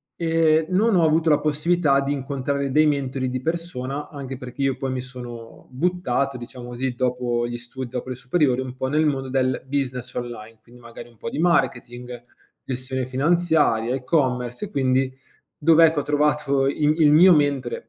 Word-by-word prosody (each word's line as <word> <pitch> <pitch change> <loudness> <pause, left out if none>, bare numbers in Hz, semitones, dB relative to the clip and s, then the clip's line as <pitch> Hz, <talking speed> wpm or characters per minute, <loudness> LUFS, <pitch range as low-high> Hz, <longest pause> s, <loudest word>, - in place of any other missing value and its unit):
e, 160 -1 +2
non 200 +3 +2
ho 170 - +4
avuto 160 +1 +2
la 150 - +4
possibilità 155 -1 +2
d'incontrare 140 0 -2
dei 155 +3 +4
mentori 135 -3 -1
di 130 0 -3
persona, 150 -3 -4
anche 135 -3 -7
perché 125 +1 -8
io 135 -1 +1
poi 135 0 -3
mi 130 - -3
sono 120 -2 -10
buttato, 140 -4 -1
diciamo 120 0 -9
così, 125 +1 -3
dopo 125 -1 -1
gli 120 - -5
studi, 120 +1 -8
dopo 125 +1 -5
le 130 - -4
superiori, 130 0 +1
un 130 -1 -6
po' 130 - -3
nel 150 +3 +1
mondo 135 -3 -1
del 130 -1 0
business 130 -2 -3
online, 115 -2 -7
quindi 120 +1 -18
magari 115 0 -11
un 115 - -23
po' 115 - -5
di - - -5
marketing, 125 -7 -1 0.4
gestione 130 0 -3
finanziaria, 145 -4 +2
e-commerce 125 - -1
e - - -10
quindi 130 -2 +1 0.5
dove, 165 +1 +5
ecco, 160 -2 +1
ho - - -2
trovato 145 -2 +1
il 150 +3 +1
il 150 -2 +6
mio 180 +5 +8
mentore 140 -6 -1
135 Hz, 175 wpm, -23 LUFS, 125-150 Hz, 0.5 s, mio